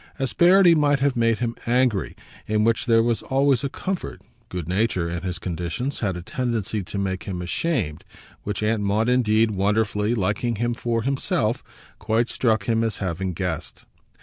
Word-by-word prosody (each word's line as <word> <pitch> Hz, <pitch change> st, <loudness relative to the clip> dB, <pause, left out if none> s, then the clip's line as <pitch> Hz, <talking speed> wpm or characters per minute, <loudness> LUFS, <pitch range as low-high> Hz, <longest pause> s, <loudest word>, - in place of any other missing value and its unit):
Asperity 175 Hz, +7 st, +5 dB
might 145 Hz, -3 st, +3 dB
have 140 Hz, -1 st, +1 dB
made 115 Hz, -1 st, +2 dB
him 120 Hz, -1 st, -2 dB
angry 120 Hz, -4 st, +1 dB, 0.3 s
in 105 Hz, 0 st, +1 dB
which 115 Hz, +2 st, +1 dB
there 115 Hz, -1 st, +5 dB
was 115 Hz, -1 st, 0 dB
always 135 Hz, -2 st, +2 dB
a 140 Hz, -, -1 dB
comfort; 190 Hz, +5 st, -4 dB, 0.3 s
good 90 Hz, -4 st, -5 dB
nature, 95 Hz, -2 st, 0 dB
in 85 Hz, 0 st, -4 dB
his 90 Hz, -2 st, -3 dB
conditions, 90 Hz, -, -4 dB
had 95 Hz, -5 st, -1 dB
a 90 Hz, -, -7 dB
tendency 115 Hz, -3 st, -2 dB
to 95 Hz, +2 st, -7 dB
make 95 Hz, -1 st, -2 dB
him 95 Hz, -3 st, -4 dB
ashamed 90 Hz, -, -2 dB, 0.4 s
which 105 Hz, 0 st, -4 dB
Aunt 110 Hz, 0 st, +1 dB
Maud 105 Hz, +4 st, +1 dB
indeed, 115 Hz, -3 st, +3 dB
wonderfully, 105 Hz, +2 st, +1 dB
liking 105 Hz, +3 st, 0 dB
him 120 Hz, +3 st, -1 dB
for 115 Hz, -1 st, -2 dB
himself, 125 Hz, -3 st, 0 dB, 0.4 s
quite 115 Hz, +2 st, 0 dB
struck 110 Hz, -3 st, +1 dB
him 115 Hz, -1 st, +1 dB
as 110 Hz, -3 st, -1 dB
having 95 Hz, 0 st, -3 dB
guessed. 90 Hz, -3 st, -4 dB
110 Hz, 170 wpm, -23 LUFS, 95-125 Hz, 0.4 s, Asperity